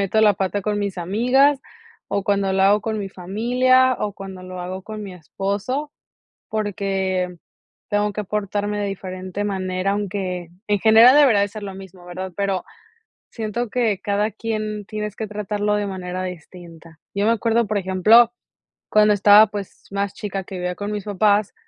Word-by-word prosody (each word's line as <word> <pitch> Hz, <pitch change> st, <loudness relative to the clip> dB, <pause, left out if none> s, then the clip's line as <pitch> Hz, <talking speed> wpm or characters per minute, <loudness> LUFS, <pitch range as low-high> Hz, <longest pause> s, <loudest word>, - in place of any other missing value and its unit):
meto 200 Hz, +3 st, +1 dB
la 210 Hz, -2 st, +5 dB
pata 195 Hz, +1 st, -1 dB
con 210 Hz, +1 st, -1 dB
mis 200 Hz, -3 st, -3 dB
amigas, 250 Hz, +10 st, +3 dB, 0.5 s
o 200 Hz, -, -1 dB
cuando 195 Hz, -1 st, +1 dB
lo 190 Hz, 0 st, +2 dB
hago 205 Hz, +2 st, +5 dB
con 220 Hz, -1 st, -3 dB
mi 195 Hz, -, -4 dB
familia, 250 Hz, +8 st, +2 dB
o 205 Hz, -1 st, -2 dB
cuando 190 Hz, -1 st, -9 dB
lo 185 Hz, 0 st, -7 dB
hago 185 Hz, +1 st, -5 dB
con 215 Hz, 0 st, -7 dB
mi 195 Hz, -, -7 dB
esposo, 200 Hz, -, -3 dB, 0.6 s
porque 190 Hz, -3 st, -2 dB, 0.5 s
tengo 205 Hz, 0 st, +1 dB
que 210 Hz, +1 st, -4 dB
portarme 205 Hz, +1 st, -2 dB
de 205 Hz, -, -1 dB
diferente 185 Hz, 0 st, -5 dB
manera, 190 Hz, -1 st, -1 dB
aunque 190 Hz, -4 st, -3 dB, 0.2 s
en 205 Hz, -, +2 dB
general, 225 Hz, +6 st, +7 dB
debería 260 Hz, -9 st, +6 dB
de 200 Hz, -, +1 dB
ser 215 Hz, +1 st, -9 dB
lo 195 Hz, -1 st, -6 dB
mismo, 190 Hz, -2 st, -12 dB
¿verdad?, 185 Hz, +1 st, -6 dB
pero, 195 Hz, -2 st, -1 dB, 0.7 s
siento 225 Hz, +1 st, -3 dB
que 220 Hz, -5 st, 0 dB
cada 205 Hz, +2 st, 0 dB
quien 215 Hz, -1 st, -4 dB
tienes 210 Hz, 0 st, -5 dB
que 220 Hz, -, -4 dB
tratarlo 210 Hz, 0 st, -1 dB
de 205 Hz, -, -1 dB
manera 185 Hz, -1 st, -4 dB
distinta, 170 Hz, -2 st, -10 dB
yo 200 Hz, +1 st, 0 dB
me 225 Hz, -, +4 dB
acuerdo, 230 Hz, 0 st, +1 dB
por 210 Hz, 0 st, -1 dB
ejemplo, 210 Hz, +5 st, +5 dB, 0.6 s
cuando 210 Hz, 0 st, +5 dB
estaba, 205 Hz, +2 st, +7 dB
pues, 205 Hz, -1 st, -8 dB
más 200 Hz, -1 st, -2 dB
chica 195 Hz, -2 st, -5 dB
que 190 Hz, +1 st, -9 dB
vivía 180 Hz, 0 st, -3 dB
con 205 Hz, +2 st, -4 dB
mis 210 Hz, -1 st, -4 dB
papás, 205 Hz, 0 st, +2 dB
205 Hz, 170 wpm, -21 LUFS, 190-215 Hz, 0.7 s, general